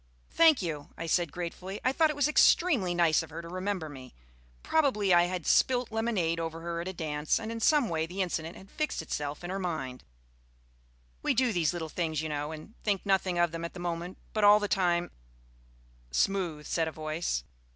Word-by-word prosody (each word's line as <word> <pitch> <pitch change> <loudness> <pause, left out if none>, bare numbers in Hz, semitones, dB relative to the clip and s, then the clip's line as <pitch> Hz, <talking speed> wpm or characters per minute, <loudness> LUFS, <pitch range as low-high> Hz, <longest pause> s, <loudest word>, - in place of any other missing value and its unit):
"Thank 320 - +5
you," 150 -4 -4
I 165 - -4
said 170 -1 +1
gratefully. 180 +4 -5
I 255 - +4
thought 315 +3 +3
it 300 - -2
was 290 0 +2
extremely 290 - +4
nice 170 -3 +4
of - - -9
her 160 +1 -7
to - - -8
remember 185 -1 -3
me. 130 -4 -11 0.5
Probably 235 - +2
I 175 0 +6
had 180 -2 -4
spilt 250 -2 +3
lemonade 215 -8 0
over 165 0 -4
her 170 0 -3
at 175 - -6
a 190 - -4
dance, 150 -3 -1
and 225 0 -5
in 230 - -4
some 290 +2 +4
way 160 -2 -1
the 190 +3 -1
incident 165 -2 -4
had 195 +1 -15
fixed 305 - -2
itself 145 0 -4
in 175 - -4
her 195 - -2
mind. 135 -9 -4 1.2
We - - +1
do 250 -1 +2
these 170 -4 +2
little 170 -2 -4
things, 160 -1 -2
you 160 0 -3
know, 150 0 -3
and 155 +7 -9
think 205 -2 0
nothing 190 -2 +1
of 175 -1 +3
them 165 0 -5
at 170 - -5
the - - -7
moment, 175 +1 -4 0.2
but 215 - 0
all 205 +1 +8
the 205 - -1
time 175 -3 +1 1.0
"Smooth," 165 - 0
said 165 +1 0
a - - -3
voice. 155 - -2
175 Hz, 205 wpm, -29 LUFS, 160-205 Hz, 1.2 s, all